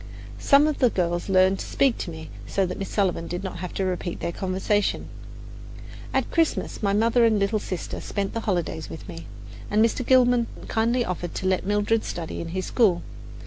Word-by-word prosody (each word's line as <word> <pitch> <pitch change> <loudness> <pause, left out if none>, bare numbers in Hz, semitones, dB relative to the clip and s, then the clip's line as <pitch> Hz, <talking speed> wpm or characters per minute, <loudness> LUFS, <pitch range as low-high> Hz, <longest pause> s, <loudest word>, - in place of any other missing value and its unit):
Some 280 +1 +5
of 305 -2 0
the 250 - +5
girls 175 -2 -1
learned 190 0 +4
to - - -4
speak 270 -4 +2
to - - -4
me, 160 -1 -8 0.2
so 195 - +1
that 180 0 -5
Miss 195 - -4
Sullivan 185 -5 0
did 180 +2 -4
not 190 -2 -5
have 180 0 -5
to 195 - 0
repeat 180 -1 -3
their - - -2
conversation. 190 +3 -1 1.0
At - - 0
Christmas, 330 -2 0
my 200 -2 +1
mother 230 +4 +3
and 225 -2 +4
little 205 +2 +1
sister 185 -4 -5
spent 200 -1 -3
the 230 - -1
holidays 175 -6 -2
with 160 - -9
me, 85 +1 -8 0.4
and 215 +2 +4
Mr. 230 +2 -1
Gilman 245 -2 +4 0.2
kindly 235 +2 +1
offered 175 -1 -4
to - - -4
let 185 0 +1
Mildred 210 +2 +1
study 165 -2 -5
in 170 - -5
his 185 +3 -3
school. 190 -8 +2
195 Hz, 195 wpm, -25 LUFS, 180-225 Hz, 1.0 s, Some